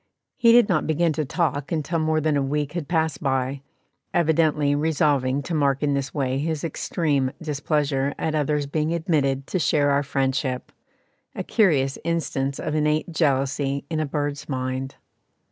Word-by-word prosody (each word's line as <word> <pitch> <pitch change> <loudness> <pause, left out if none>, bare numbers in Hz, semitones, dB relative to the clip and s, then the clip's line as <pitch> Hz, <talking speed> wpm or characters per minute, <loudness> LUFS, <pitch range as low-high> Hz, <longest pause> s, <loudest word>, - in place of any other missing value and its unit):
He 230 - +5
did 235 -2 +6
not 175 -6 +1
begin 160 +1 +2
to 155 0 -2
talk 145 -1 -1
until 165 +1 -1
more 155 0 +1
than 155 -1 +1
a 140 - +2
week 145 +1 -1
had 170 -5 -4
passed 160 -2 0
by, 135 -1 -1 0.5
evidently 155 -3 +2
resolving 145 -3 +1
to 170 - -5
mark 140 -2 +1
in 145 -1 +2
this 140 -1 -2
way 135 -2 -1
his 155 0 -2
extreme 145 -4 0
displeasure 145 -3 -1
at 160 - -2
others 150 -1 0
being 155 +3 -1
admitted 140 -5 0
to 185 - -2
share 145 -2 +2
our 140 0 +3
friendship 135 -2 -1 0.6
a - - -3
curious 145 - +2
instance 140 -5 -1
of 155 - -3
innate 155 +2 +1
jealousy 140 -2 0
in 160 - 0
a 155 - -1
bird's 145 0 -3
mind. 130 0 -3
145 Hz, 160 wpm, -24 LUFS, 135-160 Hz, 0.6 s, did